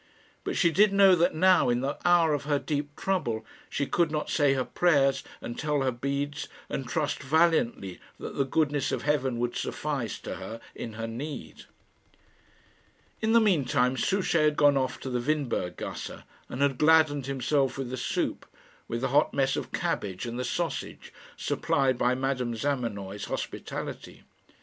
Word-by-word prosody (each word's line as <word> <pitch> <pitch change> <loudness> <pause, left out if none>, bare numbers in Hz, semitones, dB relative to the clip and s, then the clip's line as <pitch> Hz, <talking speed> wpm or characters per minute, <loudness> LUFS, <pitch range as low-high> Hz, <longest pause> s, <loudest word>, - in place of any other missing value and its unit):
But - - -2
she 170 -4 +4
did 205 +4 +5
know 195 -1 +6
that 175 0 +2
now, 185 -4 +5
in 120 0 +1
the 135 +2 -1
hour 175 -3 +4
of 145 -1 -2
her 145 -1 +2
deep 145 0 -3
trouble, 120 -13 -1 0.2
she 140 - -1
could 170 +3 +1
not 150 0 -3
say 145 -3 +3
her 130 -1 0
prayers 140 -6 +2 0.2
and 120 - -6
tell 150 -2 0
her 130 - +1
beads, 140 +4 -3 0.2
and 130 -3 -4
trust 150 -2 -1
valiantly 145 - +1 0.2
that - - -7
the 140 - +2
goodness 145 0 0
of - - -2
heaven 135 -4 +1
would 120 0 -1
suffice 140 -8 -3
to - - -5
her 115 - -7
in 115 - -6
her 115 +1 -4
need. 130 +6 -7 1.6
In 220 +1 +2
the 230 - +7
mean 195 -10 +3
time 125 +1 +1
Souchey 190 +4 +1
had 150 -1 +3
gone 145 -1 +5
off 130 -1 -1
to 130 - -4
the 125 -1 0
Windberg 135 -9 -1
gasse, - - -6 0.3
and 130 +3 -1
had 135 -3 +1
gladdened 155 -3 +4
himself 135 0 0
with 130 -2 -4
the - - -2
soup, 125 - -2 0.4
with 115 +1 -3
the 135 - 0
hot 140 - +3
mess 135 -1 +2
of - - -4
cabbage 95 0 -2
and 120 +1 -4
the - - -1
sausage, 165 +7 -4 0.2
supplied 130 -3 +1
by 125 +1 +2
Madame 130 -2 -1
Zamenoy's 110 -7 -3
hospitality. - - -6
140 Hz, 175 wpm, -28 LUFS, 125-155 Hz, 1.6 s, the